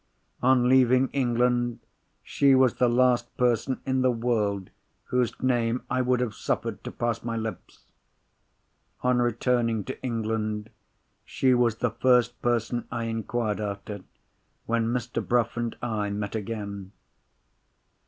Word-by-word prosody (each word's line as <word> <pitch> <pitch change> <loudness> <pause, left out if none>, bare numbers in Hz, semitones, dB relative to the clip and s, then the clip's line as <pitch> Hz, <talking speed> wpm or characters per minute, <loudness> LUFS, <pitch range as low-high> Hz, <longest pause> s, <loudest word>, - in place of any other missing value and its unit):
On 125 -1 +4
leaving 130 0 +4
England 120 -2 +1 0.5
she 140 -1 +3
was 130 -2 +4
the 125 - +2
last 120 0 +2
person 125 +1 +1
in 130 -1 +1
the 130 - +3
world 110 -5 -1 0.3
whose 125 -1 -1
name 120 -1 +1
I 130 - +2
would 125 0 +1
have 120 -4 -1
suffered 110 0 -3
to - - -6
pass 120 -1 -2
my 115 -1 -3
lips. 110 -3 -7 1.2
On 125 0 +3
returning 120 -2 +1
to 130 - -7
England, 110 -3 -2 0.5
she 130 -1 +1
was 120 -3 +3
the 120 0 -1
first 120 0 +2
person 120 0 0
I 120 -1 -2
inquired 115 -1 -2
after, 100 -1 -5 0.6
when 115 0 0
Mr. 120 +1 -2
Bruff 120 -1 +1
and 120 -1 -3
I 110 -4 -1
met 105 0 -4
again. 100 -3 -5
120 Hz, 135 wpm, -26 LUFS, 110-125 Hz, 1.2 s, On